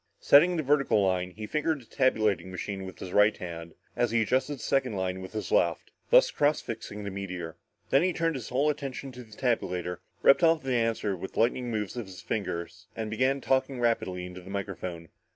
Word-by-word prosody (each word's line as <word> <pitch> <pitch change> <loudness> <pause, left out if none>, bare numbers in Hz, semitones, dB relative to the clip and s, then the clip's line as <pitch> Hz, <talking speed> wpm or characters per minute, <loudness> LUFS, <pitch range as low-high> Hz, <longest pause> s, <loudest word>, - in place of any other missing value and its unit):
Setting 175 +5 +6
the 155 - 0
vertical 140 -5 +3
line, 90 -1 0
he 105 +4 -8
fingered 155 +4 0
a - - -20
tabulating 110 -7 +1
machine 95 +1 -5
with 95 - -10
his 90 - -7
right 105 +1 +5
hand, 85 -2 -7 0.2
as 120 - +1
he 115 0 +2
adjusted 130 +5 0
the 130 - -11
second 130 -4 +1
line 95 0 -2
with 95 +2 -9
his 110 - -4
left, - - +1 0.2
thus - - +6
cross 145 +1 +2
fixing 110 -2 -6
the 100 - -4
meteor. 90 -4 -5 0.4
Then 135 - +5
he 185 +2 +2
turned 165 -1 0
his 130 -6 -6
whole 140 +4 +2
attention 140 -2 -6
to 125 0 -10
the 110 -2 -16
tabulator, 90 -8 -1 0.2
ripped 140 - +6
off 165 -2 +4
the 130 -1 -1
answer 115 -4 0
with 95 +2 -8
lightning 120 +2 +1
moves 105 -2 -3
of 120 -4 -4
his 95 -2 -10
fingers 90 -4 -4
and 110 -1 -4
began 130 +4 +1
talking 130 0 +1
rapidly 95 -7 0
into 90 0 -9
the 90 - -12
microphone. 90 -4 -5
110 Hz, 205 wpm, -28 LUFS, 95-135 Hz, 0.4 s, Setting